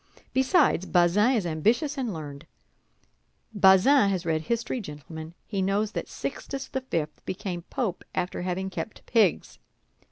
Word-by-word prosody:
Besides, 265 Hz, -, +3 dB
Bazin 190 Hz, +8 st, +4 dB
is 220 Hz, -7 st, 0 dB
ambitious 225 Hz, -, +1 dB
and 255 Hz, -5 st, -2 dB
learned; 150 Hz, -2 st, -8 dB, 1.1 s
Bazin 200 Hz, +5 st, +6 dB
has 185 Hz, -3 st, -1 dB
read 160 Hz, -1 st, +1 dB
history, 235 Hz, +6 st, -2 dB
gentlemen, 160 Hz, 0 st, -9 dB
he 200 Hz, -3 st, -2 dB
knows 200 Hz, +3 st, +1 dB
that -, -, -4 dB
Sixtus 270 Hz, -1 st, -5 dB
the 265 Hz, -, -3 dB
Fifth 160 Hz, -12 st, -3 dB
became 180 Hz, -2 st, -4 dB
Pope 230 Hz, -10 st, -2 dB
after 180 Hz, 0 st, -2 dB
having 185 Hz, +1 st, -2 dB
kept 220 Hz, -, -6 dB
pigs. 220 Hz, -7 st, +1 dB
190 Hz, 135 wpm, -27 LUFS, 170-235 Hz, 1.1 s, Bazin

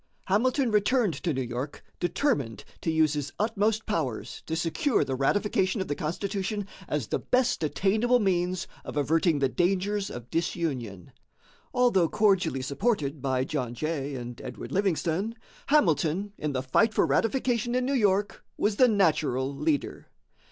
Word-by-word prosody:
Hamilton 245 Hz, +5 st, +2 dB
returned 210 Hz, -1 st, +2 dB
to 170 Hz, -, -2 dB
New 130 Hz, -2 st, -1 dB
York 125 Hz, +4 st, -5 dB, 0.2 s
determined 175 Hz, -, 0 dB, 0.2 s
to -, -, -1 dB
use 160 Hz, -2 st, +3 dB
his 145 Hz, -1 st, -3 dB
utmost 215 Hz, 0 st, 0 dB
powers 150 Hz, -, -3 dB
to 160 Hz, -, -1 dB
secure 170 Hz, -, +1 dB
the 135 Hz, -, -3 dB
ratification 190 Hz, -, +1 dB
of 190 Hz, -, -2 dB
the -, -, -1 dB
Constitution 195 Hz, +6 st, -3 dB, 0.2 s
as 150 Hz, -5 st, -1 dB
the -, -, -2 dB
best 250 Hz, -1 st, +1 dB
attainable 210 Hz, -, +2 dB
means 185 Hz, -2 st, 0 dB, 0.2 s
of -, -, -6 dB
averting 160 Hz, +3 st, +2 dB
the 140 Hz, -1 st, +2 dB
dangers 195 Hz, +6 st, 0 dB
of 120 Hz, 0 st, -9 dB
disunion. 135 Hz, -, -2 dB, 0.6 s
Although 240 Hz, -10 st, +3 dB
cordially 195 Hz, -11 st, +2 dB
supported 145 Hz, -, -1 dB
by 130 Hz, -1 st, 0 dB
John 125 Hz, -4 st, -3 dB
Jay 145 Hz, -1 st, -3 dB
and 120 Hz, -1 st, -7 dB
Edward 125 Hz, -, -7 dB
Livingston, 190 Hz, +2 st, 0 dB, 0.3 s
Hamilton, 195 Hz, -, +2 dB
in 150 Hz, -6 st, -3 dB
the 130 Hz, -1 st, -1 dB
fight 215 Hz, -, +2 dB
for -, -, +4 dB
ratification 240 Hz, 0 st, +1 dB
in 255 Hz, 0 st, +1 dB
New 275 Hz, -, 0 dB
York, 205 Hz, -5 st, +1 dB
was 205 Hz, -1 st, +1 dB
the 255 Hz, -, +7 dB
natural 150 Hz, -, +1 dB
leader. 150 Hz, 0 st, -1 dB
175 Hz, 150 wpm, -27 LUFS, 145-210 Hz, 0.6 s, the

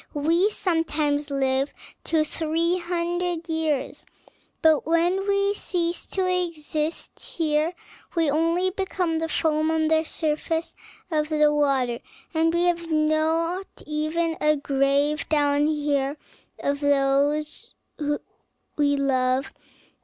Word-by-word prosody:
We 335 Hz, +7 st, +3 dB
sometimes 305 Hz, -6 st, 0 dB
live 270 Hz, 0 st, +1 dB, 0.3 s
to 320 Hz, -2 st, +2 dB
three 330 Hz, +3 st, 0 dB
hundred 345 Hz, 0 st, -2 dB
years, 320 Hz, -4 st, -1 dB, 0.6 s
but 315 Hz, -2 st, +4 dB
when 350 Hz, +4 st, +2 dB
we 400 Hz, 0 st, +2 dB
cease 345 Hz, -4 st, -2 dB
to 380 Hz, -1 st, -1 dB
exist 330 Hz, -3 st, -2 dB
here 310 Hz, 0 st, 0 dB, 0.4 s
we 330 Hz, -2 st, +2 dB
only 330 Hz, +5 st, +2 dB
become 365 Hz, -3 st, -1 dB
the 325 Hz, 0 st, -2 dB
foam 310 Hz, 0 st, +1 dB
on 320 Hz, -1 st, +1 dB
the 320 Hz, 0 st, +3 dB
surface 320 Hz, +1 st, -2 dB, 0.4 s
of 305 Hz, -1 st, 0 dB
the 300 Hz, -1 st, +3 dB
water, 270 Hz, -5 st, +1 dB, 0.3 s
and 325 Hz, 0 st, +2 dB
we 340 Hz, +1 st, +1 dB
have 340 Hz, -1 st, 0 dB
not 320 Hz, +4 st, 0 dB
even 315 Hz, +2 st, -1 dB
a 305 Hz, 0 st, +4 dB
grave 280 Hz, +2 st, +1 dB
down 290 Hz, -1 st, +3 dB
here 290 Hz, -2 st, 0 dB, 0.4 s
of 285 Hz, 0 st, -1 dB
those 285 Hz, +1 st, +1 dB, 1.0 s
we 285 Hz, -1 st, +2 dB
love. 260 Hz, 0 st, +1 dB
315 Hz, 115 wpm, -24 LUFS, 290-335 Hz, 1.0 s, but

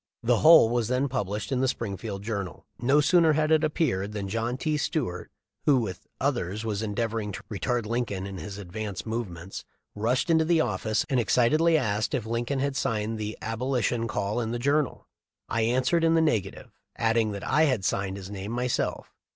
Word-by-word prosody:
The 120 Hz, 0 st, +3 dB
whole 160 Hz, -4 st, +8 dB
was 120 Hz, -2 st, 0 dB
then 125 Hz, +3 st, +1 dB
pub 125 Hz, -7 st, -2 dB
lished 105 Hz, +6 st, -4 dB
in 130 Hz, -, +1 dB
the 130 Hz, -, +2 dB
Springfield 100 Hz, -3 st, -4 dB
Journal. 100 Hz, -4 st, -4 dB
No 135 Hz, +5 st, +4 dB
sooner 165 Hz, +1 st, +4 dB
had 155 Hz, +1 st, +1 dB
it 160 Hz, 0 st, +4 dB
appeared 125 Hz, -, 0 dB
than 100 Hz, -2 st, -3 dB
John 115 Hz, +4 st, -1 dB
T. 155 Hz, +2 st, -1 dB
Stuart, 130 Hz, -, -2 dB, 0.4 s
who, 145 Hz, -3 st, +6 dB
with 95 Hz, -7 st, -4 dB
others, 115 Hz, -7 st, -1 dB
w 110 Hz, -1 st, -2 dB
r -, -, 0 dB
as 100 Hz, -, -3 dB
endeavoring 110 Hz, 0 st, -2 dB
to -, -, -7 dB
retard 120 Hz, +3 st, -1 dB
Lincoln 110 Hz, -4 st, -2 dB
in 100 Hz, -2 st, -6 dB
his 100 Hz, +5 st, -7 dB
advanced 100 Hz, +1 st, -5 dB
movements, 100 Hz, -6 st, -5 dB, 0.3 s
rushed 120 Hz, -, 0 dB
into 160 Hz, -1 st, +4 dB
the 165 Hz, 0 st, +3 dB
office 105 Hz, -4 st, 0 dB
and 130 Hz, -, +1 dB
excitedly 155 Hz, +8 st, +3 dB
asked 110 Hz, -3 st, 0 dB
it 120 Hz, -4 st, -2 dB
"Lincoln 115 Hz, +4 st, -1 dB
had 140 Hz, +1 st, -1 dB
signed 110 Hz, -3 st, -1 dB
the 105 Hz, 0 st, -4 dB
Abo 115 Hz, +4 st, -3 dB
lition 115 Hz, -1 st, 0 dB
call 105 Hz, +1 st, -1 dB
in 110 Hz, -, -2 dB
the 120 Hz, -, -2 dB
Journal?" 140 Hz, +3 st, 0 dB, 0.4 s
I 115 Hz, -, 0 dB
answered 130 Hz, +9 st, +2 dB
in 165 Hz, 0 st, +4 dB
the -, -, +4 dB
neg 115 Hz, -, +2 dB
ative, 95 Hz, -, -11 dB, 0.3 s
adding 115 Hz, -1 st, +2 dB
that 100 Hz, -, -6 dB
I 155 Hz, +4 st, +4 dB
had 125 Hz, -10 st, 0 dB
signed 100 Hz, 0 st, -1 dB
his 95 Hz, 0 st, -8 dB
name 100 Hz, +1 st, -5 dB
myself. 125 Hz, +1 st, -2 dB
115 Hz, 200 wpm, -27 LUFS, 105-135 Hz, 0.4 s, whole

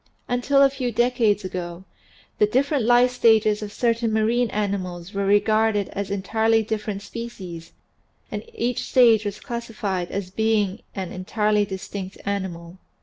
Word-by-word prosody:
Until 275 Hz, +3 st, +3 dB
a 275 Hz, -, +6 dB
few 260 Hz, -3 st, -2 dB
decades 235 Hz, -3 st, +2 dB
ago 175 Hz, -1 st, -5 dB, 0.6 s
the 210 Hz, -, +5 dB
different 270 Hz, +2 st, +1 dB
life 245 Hz, +1 st, +5 dB
stages 220 Hz, -3 st, +3 dB
of 210 Hz, -1 st, -5 dB
certain 230 Hz, 0 st, 0 dB
marine 225 Hz, +2 st, +2 dB
animals 190 Hz, -4 st, -3 dB
were 200 Hz, 0 st, -1 dB
regarded 210 Hz, 0 st, +2 dB
as 200 Hz, 0 st, -4 dB
entirely 220 Hz, +3 st, +1 dB
differ 215 Hz, 0 st, -3 dB
ent 200 Hz, -1 st, -4 dB
species 185 Hz, -9 st, -8 dB, 0.6 s
and -, -, -3 dB
each 245 Hz, -, -1 dB
stage 230 Hz, -5 st, +5 dB
was. 205 Hz, 0 st, -4 dB
classified 215 Hz, -7 st, -4 dB
as 195 Hz, -2 st, -4 dB
being 210 Hz, -2 st, 0 dB
an 190 Hz, -3 st, -4 dB
en 185 Hz, 0 st, -7 dB
tirely 210 Hz, 0 st, +2 dB
distinct 190 Hz, 0 st, -6 dB
animal. 185 Hz, -3 st, -4 dB
210 Hz, 145 wpm, -23 LUFS, 195-235 Hz, 0.6 s, a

